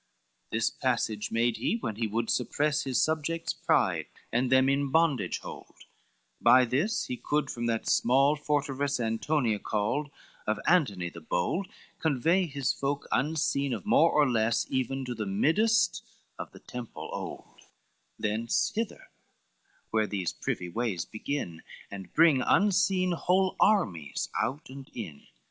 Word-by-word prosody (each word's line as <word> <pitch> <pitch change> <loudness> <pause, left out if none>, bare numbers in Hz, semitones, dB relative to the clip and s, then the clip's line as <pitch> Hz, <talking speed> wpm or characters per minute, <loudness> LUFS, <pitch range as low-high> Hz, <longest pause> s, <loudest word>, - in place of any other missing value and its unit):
XXXI - - -45
"This - - +1
passage 105 -1 -1
made 115 0 +1
he, - - 0
when 110 - -4
he 115 -1 0
would 115 +2 -1
suppress 145 +4 0
His 130 -2 0
subjects' 160 +1 0
pride, - - +1 0.3
and 125 +2 +1
them 130 0 +5
in 140 0 +1
bondage 160 -2 +2
hold; - - -10 0.7
By 130 0 +6
this 145 - 0
he 125 - -4
could 150 +1 -1
from 120 0 -3
that 115 -1 -1
small 135 +4 +4
forteress 145 -2 -1
Antonia 115 0 0
called, 110 +10 -1 0.4
of 110 0 0
Antony 105 - +2
the 85 - -11
bold, 90 - -1 0.3
Convey 165 +5 +2
his 140 -3 -1
folk 140 +1 -3
unseen 140 -2 0
of 105 -6 -5
more 160 -2 +4
and 130 -4 +1
less 115 0 +2
Even 130 +1 -1
to 125 - -3
the 110 -3 -4
middest 195 - +2 0.4
of - - -6
the - - -14
temple 125 -2 -8
old, - - -7 0.6
Thence, 110 +2 0
hither; 225 +1 -4 0.8
where 110 -1 +2
these 95 -5 -2
privy 90 - -3
ways 100 -2 -2
begin, 110 - -4 0.3
And 95 -3 -8
bring 160 -5 +5
unseen 190 - +3
whole 185 +2 +1
armies 95 - +1
out 140 +4 -2
and 135 0 -10
in. 90 -12 -8
130 Hz, 145 wpm, -29 LUFS, 110-150 Hz, 0.8 s, By